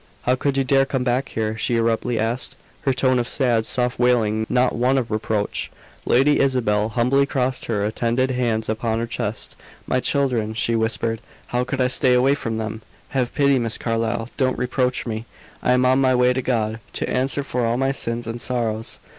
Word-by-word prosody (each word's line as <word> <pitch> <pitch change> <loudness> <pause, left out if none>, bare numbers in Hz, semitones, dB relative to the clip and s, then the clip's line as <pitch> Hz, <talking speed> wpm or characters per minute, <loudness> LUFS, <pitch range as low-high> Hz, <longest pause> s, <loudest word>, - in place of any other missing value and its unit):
"How 125 - +2
could 135 +1 0
you 135 - +3
dare 135 +1 +3
come 130 -2 -1
back 125 +2 0
here!" 110 -1 -2
she 120 +2 +1
abruptly 115 +1 0
asked, 115 +3 -2 0.3
her 135 - +4
tone 130 -1 +2
of 120 - -1
sad, 120 -6 +1
soft 125 -1 -1
wailing, 110 -3 +2
not 125 0 +2
one 125 +3 +2
of 120 -4 -2
reproach. 110 -1 -1 0.4
Lady 140 +4 +4
Isabel 110 -6 +1
humbly 130 +4 +2
crossed 130 -2 -1
her 105 -3 -1
attenuated 120 +4 0
hands 115 -3 0
upon 110 +1 -1
her 115 - -1
chest. 115 - -3 0.3
"My 130 - +1
children," 125 -6 0
she 115 +1 +1
whispered. 115 0 -1 0.2
"How 125 0 -1
could 130 +2 -4
I - - +4
stay 125 0 +3
away 130 +3 +4
from 115 -5 -3
them? 110 0 -4 0.3
Have 125 -3 -1
pity, 140 -2 +3
Miss 115 -2 -1
Carlyle! 115 0 -1
Don't 130 -2 +1
reproach 125 +1 0
me. 110 -1 -4 0.4
I 125 - +3
am 125 0 +3
on 130 +1 +4
my 130 -1 +3
way 125 0 +4
to 130 - -1
God, 110 -3 -1
to - - -2
answer 135 +2 0
for 125 -3 -2
all 115 +1 +1
my 135 +1 +1
sins 120 -3 -2
and 115 +1 -5
sorrows." 115 -3 -2
125 Hz, 195 wpm, -22 LUFS, 115-130 Hz, 0.4 s, her